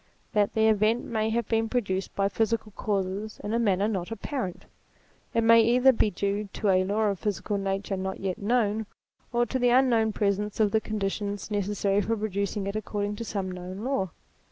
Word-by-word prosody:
that 205 -1 +2
the 220 0 +4
event 220 +2 +2
may 220 -1 -1
have 235 +1 -1
been 225 -1 +1
produced 195 -6 -1
by 195 0 +2
physical 220 +1 -1
causes, 200 +1 -2
in 205 - -3
a 230 - +2
manner 200 -3 +2
not 190 -4 -2
apparent. 225 - -4 0.7
It 230 - +3
may 230 0 +7
either 250 +4 +5
be 225 -3 +2
due 200 +2 -2
to 210 - 0
a 185 -1 +4
law 210 +3 +1
of 200 -3 -2
physical 205 0 -2
nature 195 0 -2
not 190 0 -4
yet 190 -2 -3
known, 215 -1 +1 0.4
or 240 0 +2
to 260 - -2
the 245 0 +3
un 260 +1 +5
known 225 -2 +3
presence 205 0 -1
of 210 -2 +3
the 220 - +2
conditions 205 -1 -3
necessary 205 0 +1
for 225 +3 -1
pro 215 +1 -2
ducing 200 0 -2
it 200 - -3
according 205 -1 -2
to 230 - -4
some 195 -4 -3
known 185 +3 -7
law. 255 -8 0
210 Hz, 200 wpm, -27 LUFS, 195-225 Hz, 0.7 s, may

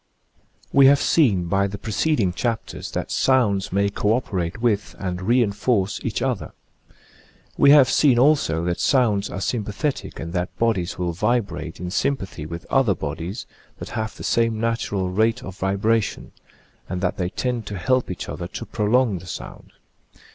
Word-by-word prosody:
We 135 -1 +7
have 140 +1 +6
seen 105 - +3
by 100 +3 +1
the 100 +1 -6
preceding 110 - 0
chapters 115 +3 -3
that - - -3
sounds 105 -7 +2
may 100 +1 +2
co 105 +1 +1
operate 95 -7 -2
with 110 -4 0
and 90 -2 -4
re 120 +6 +3
enforce 100 -1 0
each - - -2
other. - - -2 1.0
We 140 - +5
have 140 -3 +8
seen 130 -1 +4
also 125 - +3
that 85 0 -1
sounds 110 -7 +2
are - - -5
sympathetic 110 +7 -3
and 85 +1 -6
that 90 0 -3
bodies 110 -7 0
will 90 -1 -2
vibrate 100 -5 -1
in 90 0 -5
sympathy 95 - -2
with 85 +1 -7
other 130 -8 +3
bodies 80 - -5 0.3
that - - -8
have 110 -1 -4
the - - -8
same 115 -1 +1
natural 105 -5 -1
rate 110 +5 +1
of 95 -3 -9
vibration, 100 +3 0 0.6
and 90 - -3
that 90 - -1
they 90 -1 -1
tend 120 +1 -3
to 100 - -5
help 130 +7 +1
each 90 - -5
other 85 - -5
to 115 - -7
prolong 110 -2 +1
the 90 - -13
sound. - - -8
105 Hz, 165 wpm, -22 LUFS, 90-120 Hz, 1.0 s, have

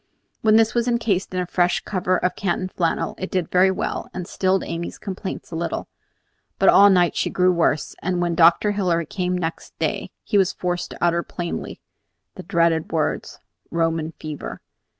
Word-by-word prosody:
When 215 -1 +4
this 225 0 +4
was 235 0 +1
encased 225 -6 0
in 185 - -2
a 180 - 0
fresh 175 0 +1
cover 185 -2 0
of 180 - -1
Canton 185 -1 -1
flannel, 170 -3 -1
it 190 - -4
did 185 -3 -2
very 185 +1 +5
well, 190 - -3
and 180 -2 -4
stilled 190 -2 +1
Amy's 170 +1 -5
complaints 190 -2 -6
a - - -5
little; 165 -1 -3 0.7
but - - +5
all 200 +1 +8
night 180 -3 +3
she - - 0
grew 185 0 +3
worse, 165 -4 0
and 180 0 -1
when 175 -1 0
Dr. 170 +5 +5
Hilary 180 -5 0
came 180 +1 -2
next 165 -2 -5
day, - - -2
he 205 - +2
was 190 -2 +2
forced 175 -1 -2
to - - -7
utter 170 0 +3
plainly 170 0 -5 0.5
the - - -8
dreaded 170 -3 +1
words 160 -2 -1 0.3
"Roman 165 -1 -1
fever." 155 -2 -7
180 Hz, 180 wpm, -22 LUFS, 170-190 Hz, 0.7 s, all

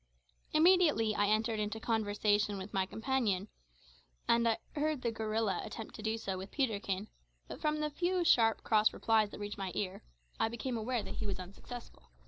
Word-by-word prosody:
Immediately 310 - +5
I 205 -1 +2
entered 220 +1 +1
into 210 +1 -2
conversation 210 -2 +1
with 190 +1 -7
my 190 -1 +1
companion, 220 -4 0 0.8
and 235 0 +4
I 225 - +1 0.2
heard 300 -2 0
"the 235 - +1
gorilla" 220 -3 -1
attempt 225 - -7
to - - -8
do 220 +1 -1
so 190 -4 -3
with 190 +1 -7
Peterkin; 210 -6 -1 0.4
but - - -8
from 305 0 +1
the 300 0 -1
few 355 +3 0
sharp 225 -8 +4
cross 215 -1 +4
replies 220 -2 +2
that - - -10
reached 205 0 -5
my 190 -2 -3
ear, 190 -2 -3 0.4
I - - +3
became 235 +2 -3
aware 230 0 -1
that - - -7
he - - -3
was 195 - -2
unsuccessful. 185 - -10
220 Hz, 180 wpm, -33 LUFS, 205-245 Hz, 0.8 s, Immediately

